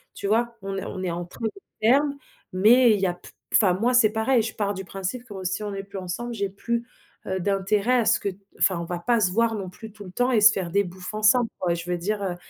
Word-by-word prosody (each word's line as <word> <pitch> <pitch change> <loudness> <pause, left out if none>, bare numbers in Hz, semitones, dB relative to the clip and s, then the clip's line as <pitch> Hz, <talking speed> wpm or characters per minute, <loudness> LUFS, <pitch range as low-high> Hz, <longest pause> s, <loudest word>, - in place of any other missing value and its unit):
tu - - -7
vois? 235 +3 +1
On 195 0 -4
est - - -4
on 185 - -5
est 180 - -1
en 175 +1 -4
très 180 - -15
bon - - +2 0.3
termes 280 +6 +3 0.4
mais 235 +4 +6
il 205 - -1
y - - +2
a 180 - +1
p 175 - -15 0.2
enfin 190 -5 +5
moi 230 +7 +1
c'est 235 -4 +5
pareil 230 +2 +2
je 225 +1 -5
pars 205 -2 -1
du 190 -1 -7
principe 195 +7 -5
que 200 -5 -8
si 185 +3 -2
on 205 -1 -4
est 195 0 -5
plus 200 0 -9
ensemble, 190 +7 -5
j'ai 200 -3 -1
plus, 235 +4 -3 0.4
heu, 190 - -2
d'intérêt 200 +5 +1
à 230 - +1
ce 235 - +4
que 200 - -1
t 190 0 -10 0.2
enfin 185 -3 +3
on 170 - -4
va 175 +1 -4
pas 235 +6 +2
se 195 -4 +2
voir 230 +3 +2
non 195 -3 -5
plus 220 +4 -11
tout 205 -1 -12
le 185 - -10
temps 245 +6 +1
et 235 - +4
se 215 +1 +7
faire 185 -4 -3
des 200 +2 +2
bouffes 180 +2 -8
ensemble 215 +3 +3
quoi, 175 -2 +1
je 170 +1 -6
veux 175 - 0
dire, 200 +4 -2
heu, 185 -2 -2
200 Hz, 285 wpm, -25 LUFS, 185-230 Hz, 0.4 s, se